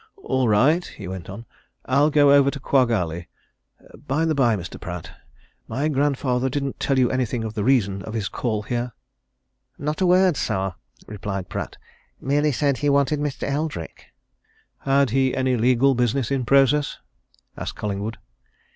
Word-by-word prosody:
"All 130 -2 +1
right," 135 +12 +4
he 100 - -9
went 95 -1 -7
on. 115 +5 -8 0.4
"I'll 140 +4 +3
go 145 -2 +5
over 140 -1 +5
to 140 - -5
Quagg 130 -2 +2
Alley. 85 -6 -2 0.8
Bye 150 +5 +1
the 160 - +1
bye, 120 -6 +3
Mr. 90 -1 -8
Pratt 85 -2 -6 0.6
my 140 +7 -1
grandfather 135 -3 0
didn't 140 0 -3
tell 135 - +1
you 125 -2 +3
anything 125 -2 -1
of 110 -1 -4
the 105 -2 -2
reason 100 -7 +2
of 110 +4 -7
his 105 -3 -1
call 110 -4 -2
here?" 120 +1 -3 0.8
"Not 150 +5 -3
a 185 - +4
word, 180 -3 +4
sir," 95 0 -1 0.3
replied 100 -3 -5
Pratt. - - -5 0.4
"Merely 145 +3 +1
said 140 0 0
he 145 - +1
wanted 140 +1 +2
Mr. 145 -2 -3
Eldrick." 145 - -4 0.7
"Had 135 -2 +2
he 130 0 +2
any 130 -1 +1
legal 125 +3 +3
business 125 +1 0
in 135 -3 0
process?" 140 +3 +3 0.6
asked - - -5
Collingwood. 105 +2 -4
130 Hz, 160 wpm, -23 LUFS, 110-140 Hz, 0.8 s, go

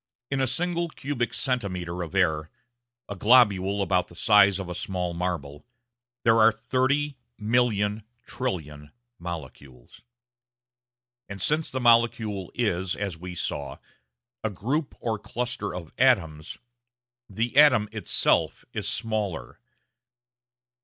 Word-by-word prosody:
In 135 -1 0
a 130 - +2
single 170 +5 -1
cubic 135 -6 -3
centimetre 90 -9 -2
of 85 +2 -6
air 80 -5 +1 0.6
a 100 - -6
globule 100 -3 +4
about 90 -2 +1
the 85 - -15
size 100 0 +5
of 95 -2 -5
a 90 - -4
small 90 -1 -3
marble 85 -5 -4 0.6
there 115 0 +4
are 110 +1 +7
thirty 130 +5 0 0.2
million 110 -2 +1 0.2
trillion 75 - -5 0.3
molecules. 70 -7 -9 1.3
And 100 0 -7
since 150 - +1
the 130 - -3
molecule 115 -5 +2
is, 95 -6 0
as 100 -4 -3
we 90 +2 -8
saw, 70 -5 -3 0.7
a 110 - 0
group 130 - -2
or 110 -2 -2
cluster 120 -3 -4
of 85 -3 -8
atoms, 85 -12 +2 0.7
the 115 +5 -2
atom 130 -8 +6
itself 110 -1 +1
is - - -2
smaller. 105 - -3
105 Hz, 120 wpm, -26 LUFS, 90-120 Hz, 1.3 s, are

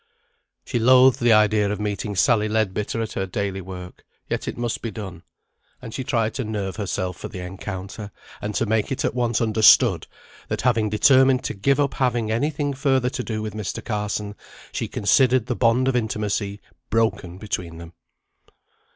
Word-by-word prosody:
She 120 - -1
loathed 130 +2 +6
the 120 0 +4
idea 105 -1 +4
of 105 - -3
meeting 105 0 -3
Sally 105 +3 +3
Leadbitter 110 +1 -1
at 110 - -6
her 95 - -2
daily 95 +1 -3
work; 90 -1 -9 0.2
yet - - -3
it - - -4
must 120 -1 -2
be 115 - -3
done, 95 -6 -8 0.6
and 115 -3 -9
she 130 - -3
tried 115 -3 0
to 130 - -3
nerve 105 -3 -4
herself 95 -3 -3
for - - -6
the 100 - -9
encounter, 95 +2 -7 0.3
and 105 0 -4
to - - +1
make 110 +1 0
it 135 - -1
at - - 0
once 120 -2 0
understood, 110 -1 +5 0.4
that - - -2
having 115 -4 +2
determined 130 +4 +4
to - - -3
give 135 +8 +1
up 140 -3 +1
having 120 -4 0
any 125 +7 +1
thing 145 -1 -2
further 130 -2 +1
to 125 - -4
do 110 -2 -4
with 105 -2 -5
Mr. 105 -3 -5
Carson, 105 -1 -3 0.4
she - - -3
considered 130 +2 +3
the 125 - -2
bond 120 +2 +2
of 135 - +1
intimacy 105 -3 -2 0.3
broken 110 -5 0
between 90 -5 -5
them. 85 0 -11
110 Hz, 180 wpm, -23 LUFS, 100-125 Hz, 0.6 s, loathed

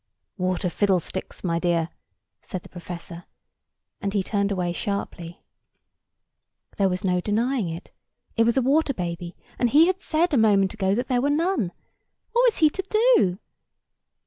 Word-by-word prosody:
"Water 185 0 0
fiddlesticks, 190 0 -1
my 170 -2 0
dear!" 170 -2 +1 0.5
said 185 - -6
the - - -14
professor; 175 -1 -8 0.8
and 200 -1 -2
he 200 - +2
turned 200 0 0
away 180 -3 -1
sharply. 175 -3 -4 1.3
There 195 -1 +3
was 180 0 -3
no 180 -2 +2
denying 225 0 0
it. 165 +2 -8 0.4
It 225 - +4
was 235 +2 +2
a 265 - +3
water 280 +1 +2
baby: 170 -1 -4 0.2
and 245 - +3
he 300 +6 +6
had 370 +1 0
said 330 +1 +1
a - - +4
moment 200 -4 +4
ago 195 -2 0
that 245 +3 -2
there 250 -1 +1
were 285 - +1
none. 310 - +1 0.6
What 475 +2 +3
was 465 - +1
he 310 -3 +5
to 385 - -3 0.3
do? 185 - +2
200 Hz, 160 wpm, -24 LUFS, 180-260 Hz, 1.3 s, he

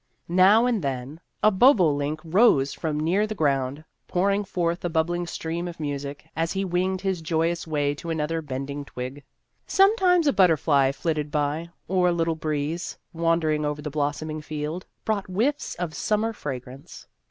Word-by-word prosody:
Now 190 +6 +5
and 240 -5 +1
then 135 +3 -4 0.2
a 215 - +6
bobolink 155 - +3
rose 160 - +4
from 155 -2 -2
near 185 +7 +1
the 215 - -4
ground, 140 -2 0 0.2
pour 190 +3 +1
ing 200 +1 0
forth 175 -3 -1
a 175 - 0
bubbling 175 +2 0
stream 170 +1 -4
of 170 -2 -8
music, 145 0 -5
as 165 +1 -1
he 195 0 -1
winged 185 +1 0
his 190 -3 -1
joyous 165 +2 -1
way 145 -2 0
to 155 +3 -8
another 160 0 -1
bend 135 -1 -5
ing 145 0 -5
twig. 130 +2 -7 0.4
Sometimes 385 -4 +4
a 285 - +3
butterfly 155 -7 +4
flitted 150 0 -2
by, 150 +3 -1 0.2
or 180 -1 +2
a - - +3
little 165 -1 +1
breeze, 155 +1 -3 0.2
wandering 165 -2 +1
over 150 0 -2
the 150 0 -5
blossoming 155 +1 -2
field, 155 +3 -5 0.2
brought 210 -3 -1
whiffs 235 +11 -1
of 175 -3 -4
sum 210 +7 0
mer 225 +1 -1
fragrance. 130 - -8
165 Hz, 170 wpm, -25 LUFS, 145-185 Hz, 0.4 s, a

